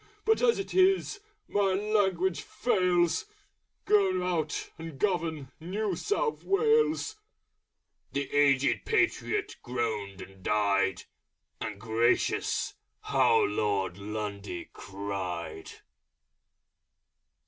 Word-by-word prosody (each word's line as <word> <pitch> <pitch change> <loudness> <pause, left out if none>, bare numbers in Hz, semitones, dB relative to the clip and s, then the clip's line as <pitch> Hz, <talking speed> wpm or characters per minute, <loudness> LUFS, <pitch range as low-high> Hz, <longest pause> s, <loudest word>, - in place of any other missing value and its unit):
But 445 0 +3
as 475 -2 +4
it 395 - -5
is!... 380 +2 +3 0.3
My 200 -2 +2
language 190 -5 +1
fails! 180 - +1 0.6
Go 190 -3 +3
out 160 -4 -2
and 165 -3 -7
govern 160 -8 -1
New 190 +4 -2
South 430 - -1
Wales!" 435 -1 +2 0.9
The 140 0 -2
Aged 140 -2 +3
Patriot 425 -2 0
groaned 110 -6 -3
and 95 0 -11
died: 100 -2 +1 0.6
And 100 -2 -5
gracious! 115 +2 +1 0.3
how 445 +1 +3
Lord 100 - 0
Lundy 100 -3 -5
cried! 95 -5 -5
165 Hz, 90 wpm, -29 LUFS, -, 0.9 s, as